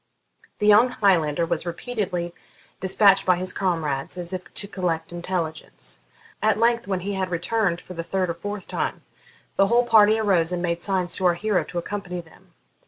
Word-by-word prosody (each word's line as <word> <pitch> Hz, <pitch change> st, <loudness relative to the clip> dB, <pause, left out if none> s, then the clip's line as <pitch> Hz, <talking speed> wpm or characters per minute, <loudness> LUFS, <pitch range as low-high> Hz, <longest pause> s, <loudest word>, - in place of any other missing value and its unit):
The 210 Hz, -, -1 dB
young 210 Hz, +4 st, +6 dB
Highlander 170 Hz, -8 st, +2 dB
was 170 Hz, -1 st, -2 dB
repeatedly 180 Hz, -1 st, -3 dB, 0.5 s
despatched 195 Hz, +1 st, +4 dB
by 185 Hz, -, +4 dB
his 180 Hz, +1 st, 0 dB
comrades 160 Hz, -6 st, -2 dB
as 175 Hz, +1 st, -3 dB
if 180 Hz, -1 st, -6 dB
to 200 Hz, -, -2 dB
collect 175 Hz, -5 st, -2 dB
intelligence. 175 Hz, -2 st, -5 dB, 0.4 s
At 215 Hz, -1 st, +2 dB
length, 235 Hz, 0 st, +2 dB
when 190 Hz, -2 st, -1 dB
he 200 Hz, +3 st, -3 dB
had 190 Hz, -1 st, -2 dB
returned 180 Hz, +1 st, 0 dB
for 180 Hz, -, -11 dB
the 170 Hz, -, -4 dB
third 185 Hz, +2 st, -1 dB
or 170 Hz, -, -2 dB
fourth 205 Hz, +3 st, -6 dB
time, -, -, -3 dB, 0.5 s
the 195 Hz, -, +5 dB
whole 240 Hz, +3 st, +3 dB
party 215 Hz, -1 st, +5 dB
arose 185 Hz, -6 st, +2 dB
and 180 Hz, -, -1 dB
made 170 Hz, -1 st, -2 dB
signs 185 Hz, -2 st, 0 dB
to 185 Hz, -, +2 dB
our 175 Hz, -, +3 dB
hero 205 Hz, +1 st, 0 dB
to 175 Hz, -, -7 dB
accompany 180 Hz, 0 st, -4 dB
them. 165 Hz, -2 st, -16 dB
185 Hz, 180 wpm, -24 LUFS, 170-205 Hz, 0.5 s, young